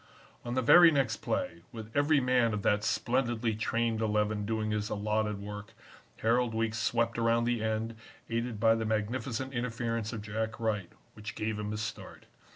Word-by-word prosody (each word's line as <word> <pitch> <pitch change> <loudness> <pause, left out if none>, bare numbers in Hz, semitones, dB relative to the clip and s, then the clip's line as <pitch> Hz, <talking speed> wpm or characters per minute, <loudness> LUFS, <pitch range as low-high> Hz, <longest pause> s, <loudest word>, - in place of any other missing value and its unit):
"On 120 0 -4
the 130 - +1
very 175 +7 +9
next 135 -7 +1
play, 85 0 -3
with 110 -1 -9
every 145 +1 +4
man 125 -4 +2
of 105 - -4
that 105 0 +2
splendidly 120 -1 0
trained 115 +1 0
Eleven 105 -1 0
doing 110 -1 -1
his 105 0 -1
allotted 105 0 -1
work, 105 0 -8 0.5
Harold 115 0 +2
Weekes 115 0 -1
swept 115 +1 0
around 115 0 +3
the 120 -2 0
end, 110 +1 -1 0.3
aided 115 -1 -2
by 115 0 +5
the 115 0 -1
magnificent 115 +4 -2
interference 115 -2 -2
of 110 -3 -5
Jack 110 +1 -3
Wright, 105 -5 -1 0.2
which 105 0 -8
gave 110 0 -2
him 105 0 -3
his 105 0 -3
start. 110 - -7
110 Hz, 170 wpm, -30 LUFS, 105-120 Hz, 0.5 s, very